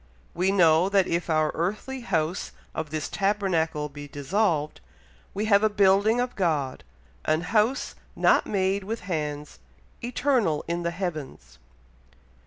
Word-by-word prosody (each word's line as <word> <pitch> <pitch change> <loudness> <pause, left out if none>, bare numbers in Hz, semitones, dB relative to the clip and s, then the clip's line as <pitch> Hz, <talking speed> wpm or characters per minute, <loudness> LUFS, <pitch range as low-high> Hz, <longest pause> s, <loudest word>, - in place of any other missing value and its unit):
"We 185 +3 +1
know 175 -1 +4
that 195 -2 +3
if 170 +1 -2
our 155 -1 +2
earthly 210 +10 -3
house 170 -5 -2 0.2
of 160 -1 -4
this 155 0 -3
tabernacle 185 -7 0
be 145 0 -9
dissolved, 150 - -1 0.5
we 210 +2 -1
have 200 -2 +5
a 215 - +4
building 205 +3 +3
of 245 0 -2
God, 150 -8 -1 0.4
an 155 +1 +2
house 215 - +1 0.2
not - - +3
made 195 0 0
with 225 +4 -4
hands, 150 -5 -4 0.4
eternal 240 - +1
in 170 +1 -2
the 170 - -1
heavens." 155 - -6
180 Hz, 135 wpm, -26 LUFS, 155-205 Hz, 0.5 s, have